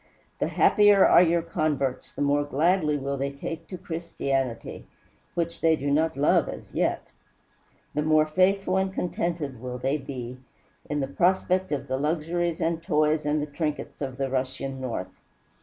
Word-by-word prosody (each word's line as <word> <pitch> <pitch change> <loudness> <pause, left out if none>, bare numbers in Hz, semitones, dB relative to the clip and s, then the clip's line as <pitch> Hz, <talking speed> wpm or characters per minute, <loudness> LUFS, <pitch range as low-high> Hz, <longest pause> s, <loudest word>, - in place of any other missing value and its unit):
The - - +1
happier 205 -2 +5
are - - +7
your 170 -1 +3
converts, 150 -6 -1
the - - -3
more 145 +1 +2
kindly 150 +2 +2
will 140 0 -3
they 140 +1 -1
take 160 +4 -6
to 185 - -7
Christianity 150 - -3 0.5
which 170 -1 -2
they 160 -1 +4
do 140 -1 -2
not 155 0 +1
love 145 - +3
as - - -9
yet! - - -1 0.8
the 150 - 0
more 155 0 +4
faithful 185 +3 +2
and 190 0 0
contented 170 -8 -3
will 125 -1 -5
they 135 +4 0
be, 130 -3 -7 0.5
in 145 -1 -1
the 135 - -1
prospect 185 +4 +1
of 140 -1 -2
the 130 0 -1
luxuries 165 +3 -1
and 165 0 0
the - - -25
toys 155 -2 +1
and 150 0 +1
the 150 - -7
trinkets 150 -1 -4
of 130 -2 -4
the 135 -1 -1
Russian 130 0 -3
north. 95 -8 -5
150 Hz, 170 wpm, -26 LUFS, 135-170 Hz, 0.8 s, are